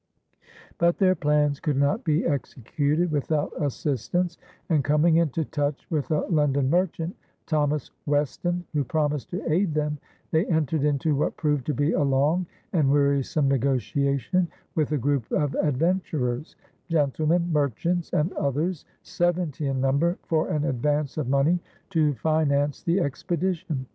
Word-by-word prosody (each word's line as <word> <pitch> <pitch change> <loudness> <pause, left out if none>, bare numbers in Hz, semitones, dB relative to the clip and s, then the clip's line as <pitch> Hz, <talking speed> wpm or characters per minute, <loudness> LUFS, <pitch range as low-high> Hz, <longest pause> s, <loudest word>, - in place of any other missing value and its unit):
But 170 0 +3
their 185 -2 +4
plans 150 -3 +1
could 150 -6 -1
not 140 - +1
be 155 +1 +1
executed 145 +3 -1
without 150 +1 0
assistance; 150 +5 -1 0.3
and, 155 -5 +2
coming 150 +3 +3
into 160 -1 +1
touch 145 -1 -2
with 150 -4 -1
a 155 -2 +2
London 140 -5 +1
merchant, 175 -1 0 0.3
Thomas 150 -3 0 0.2
Weston, 160 +5 0
who 145 -2 +1
promised 150 +1 -1
to 180 +3 -4
aid 175 -2 +1
them, 150 -1 -1 0.3
they 160 +3 +2
entered 160 -3 +1
into 150 +1 +1
what 140 - -1
proved 150 -4 0
to 150 - 0
be 145 +4 +1
a - - +1
long 145 +6 +2 0.3
and 150 -6 +3
wearisome 140 0 +2
negotiation 140 - +1 0.3
with 155 -2 0
a 150 - +2
group 140 -2 0
of 145 -2 +1
adventurers 150 -3 -1 0.3
gentlemen, 160 +2 +1
merchants, 155 +5 0
and 155 +5 +1
others, 150 +5 -1 0.2
seventy 175 -4 -1
in 135 -1 -1
number 140 +7 +1
for 160 -1 0
an 150 -1 0
advance 145 +1 0
of 135 -5 -2
money 140 +6 +3 0.3
to 155 -5 +2
finance 145 +1 +1
the 175 +3 +1
expedition. 170 -1 -2
150 Hz, 145 wpm, -25 LUFS, 140-165 Hz, 0.3 s, their